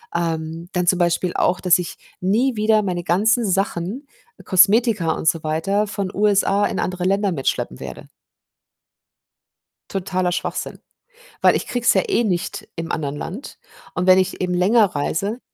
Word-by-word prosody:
ähm, 165 0 -3
dann 180 -1 -1
zum 185 0 +3
Beispiel 175 +1 +1
auch, 180 - +1
dass 180 -2 +4
ich 175 - -6 0.2
nie 230 +8 +1
wieder 215 0 +3
meine 180 -3 -3
ganzen 210 +6 +2
Sachen, 195 - -2 0.4
Kosmetika 195 -1 +4
und 160 - -3
so 160 0 +2
weiter, 180 +7 0
von 200 -2 -4
USA 205 0 +2
in - - -2
andere 180 -1 -2
Länder 195 +1 +1
mitschleppen 135 - -2
werde. - - -9 1.8
Totaler 185 -2 -1
Schwachsinn, 175 - -4 0.6
weil - - +5
ich - - -3
kriege 245 -1 -3
es 240 - +6
ja - - +2
eh 240 - +1
nicht 180 -4 -3
im 165 0 -5
anderen 145 -2 -3
Land 200 - -7 0.4
und 180 +1 -1
wenn 185 0 +7
ich 190 0 -1
eben 180 -1 -1
länger 205 +5 +4
reise 195 - -2
185 Hz, 160 wpm, -21 LUFS, 175-205 Hz, 1.8 s, wenn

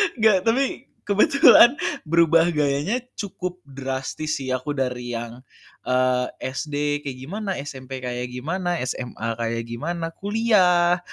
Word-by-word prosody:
Enggak, 220 -5 +4
tapi 255 +3 0 0.2
kebetulan 240 - +6 0.3
berubah 165 +1 +4
gayanya 150 - 0 0.2
cukup 180 -3 -5
drastis 135 +3 -4
sih, 130 - -5
aku 130 +3 -2
dari 125 -3 -3
yang, 120 +1 -6 0.4
eee, 125 0 +2 0.2
SD 145 +2 -2
kayak 135 -2 -5
gimana, 200 +8 -4
SMP 130 -2 -8
kayak 125 0 -4
gimana, 175 +8 -2
SMA 125 -2 -4
kayak 115 0 -2
gimana, 165 +8 -3
kuliah, 185 -5 +3
150 Hz, 120 wpm, -23 LUFS, 130-185 Hz, 0.4 s, kebetulan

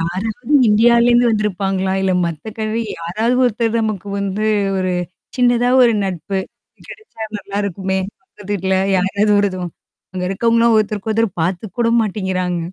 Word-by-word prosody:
யாராவது 210 - -2
இந்தியாலேருந்து 235 +2 +4
வந்திருப்பாங்களா? 195 -3 -1
இல்ல 190 -1 +1
மத்த 165 -3 -6
கன்ட்ரி 220 +1 -1 0.2
யாராவது 215 +9 -1
ஒருத்தர் 230 -1 +1
நமக்கு 210 -3 -3
வந்து 200 +2 -2 0.3
ஒரு 185 -1 -1 0.4
சின்னதா 245 -1 +3
ஒரு 235 -2 +5
நட்பு 190 +1 -3 0.5
கிடைச்சா 430 - -11 0.2
நல்லாருக்குமே. 195 -1 -3 0.2
பக்கத்துல 205 -2 -16
வீட்ல 190 -1 0 0.2
யாராவதும் 200 -2 +1 0.4
அங்க 185 -1 -3
இருக்கவங்கள்லாம் 230 +3 +2
ஒருத்தருக்கு 215 0 -1
ஒருத்தர் 225 0 +2
பார்த்துக்க 185 +4 -2
கூட 235 - +2
மாட்டேங்கிறாங்க. 190 -4 -2
205 Hz, 125 wpm, -18 LUFS, 190-230 Hz, 0.5 s, ஒரு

